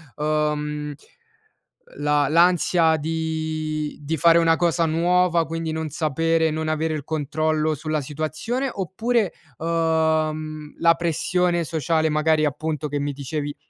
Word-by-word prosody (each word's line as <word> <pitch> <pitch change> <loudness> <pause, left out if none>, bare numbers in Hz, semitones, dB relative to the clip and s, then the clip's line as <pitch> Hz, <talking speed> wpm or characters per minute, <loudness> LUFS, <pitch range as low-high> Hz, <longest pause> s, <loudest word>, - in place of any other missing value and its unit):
uhm, 150 -1 -1 1.0
la 145 -1 +2
l'ansia 170 0 +4
di 155 -1 -3
di 150 +2 -3
fare 165 +2 +5
una 165 -1 +4
cosa 170 -1 +2
nuova, 170 +1 +2
quindi 165 0 -3
non 160 -1 -3
sapere 160 +2 +1
non 155 +1 -3
avere 155 0 0
il 150 -3 -4
controllo 155 +1 0
sulla 155 +1 -2
situazione 155 - -3
oppure, 210 +2 -1 0.2
uhm, 155 -2 0
la 165 0 +5
pressione 175 +1 0
sociale 160 0 0
magari 155 0 +2
appunto 150 +1 -2
che 145 0 -2
mi 145 0 -2
dicevi 145 +1 -4
160 Hz, 125 wpm, -23 LUFS, 150-165 Hz, 1.0 s, fare